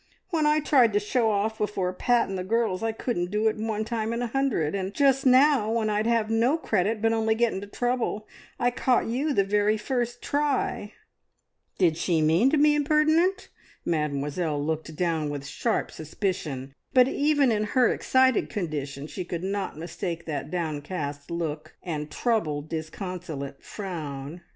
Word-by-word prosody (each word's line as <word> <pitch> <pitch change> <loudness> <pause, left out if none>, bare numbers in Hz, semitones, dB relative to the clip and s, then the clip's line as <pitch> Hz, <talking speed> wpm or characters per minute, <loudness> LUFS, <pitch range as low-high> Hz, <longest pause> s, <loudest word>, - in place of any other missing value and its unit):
"When 315 -3 +2
I 305 +1 +3
tried 255 -7 +4
to 205 - +3
show 225 +2 +1
off 215 +1 0
before 190 -3 -1
Pat 240 +5 +2
and 195 - -4
the 185 - -3
girls, 220 -1 0
I 225 0 0
couldn't 220 -6 -2
do 210 +3 +1
it 220 - +1
one 220 0 -2
time 225 0 -2
in 235 +1 -2
a - - 0
hundred, 240 - 0
and 195 0 -3
just 270 -1 +3
now, 260 -3 +5
when 220 -2 +1
I'd 210 +2 0
have 230 -2 +1
no 235 +7 +3
credit, 215 - 0
but 225 0 +3
only 220 0 +1
get 235 0 +2
into 195 +2 -5
trouble, 240 -1 -2 0.3
I 245 -1 +2
caught 245 0 +1
you 265 +7 -1
the 200 -8 +3
very 210 +2 +2
first 240 +1 -2
try!" 285 -7 -1 0.8
Did 170 -4 +3
she 170 -1 +1
mean 160 +11 +4
to 305 - +2
be 295 +1 +5
impertinent? 310 +6 +2 0.4
Mademoiselle 150 -1 -1
looked 160 0 -3
down 165 -3 0
with 145 -1 -5
sharp 225 +10 -1
suspicion, 155 -5 -4 0.2
but 250 -1 +7
even 285 -2 +2
in 215 -1 +1
her 250 -2 +6
excited 260 -2 +2
condition 145 -8 -4
she 185 +4 -5
could 175 0 -5
not 195 -3 -3
mistake 170 +1 -5
that 145 -2 -4
downcast 150 -3 -4
look, 160 -2 -4
and 155 -4 -4
troubled, 155 -8 -1
disconsolate 160 -4 -6
frown. 160 -5 -6
210 Hz, 170 wpm, -26 LUFS, 160-240 Hz, 0.8 s, but